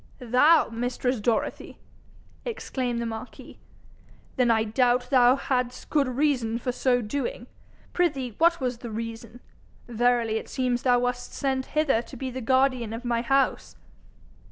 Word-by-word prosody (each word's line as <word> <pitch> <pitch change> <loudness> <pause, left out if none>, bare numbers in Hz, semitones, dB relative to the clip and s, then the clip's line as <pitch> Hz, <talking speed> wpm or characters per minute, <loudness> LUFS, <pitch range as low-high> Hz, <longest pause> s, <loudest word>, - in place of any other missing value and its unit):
'Thou, 255 +7 +4
mistress 245 +1 -2
Dorothy!' 220 +1 -2 0.7
exclaimed 255 - -3
the 235 - -2
marquis. 225 +1 -8 0.8
'Then 250 -2 +2
I 220 -1 +3
doubt 245 +3 +2
not 250 - -18
thou 250 -1 +6
hadst 250 -2 -3
good 290 -3 +2
reason 255 -4 0
for 250 +1 -2
so 245 -1 +1
doing. 285 - -4 0.5
Prithee 275 -9 0
what 335 +1 +4
was 250 -3 -2
the 240 - -7
reason? 230 +1 -7 0.5
Verily 240 -1 +1
it - - -7
seems 250 -2 -1
thou 245 -1 +3
wast 245 0 -2
sent 265 -1 -1
hither 275 -7 +3
to 260 +2 -12
be 260 +1 -4
the 260 +1 -5
guardian 255 -2 +1
of 230 +2 -7
my 235 -1 0
house!' 270 +2 0
245 Hz, 150 wpm, -26 LUFS, 235-265 Hz, 0.8 s, thou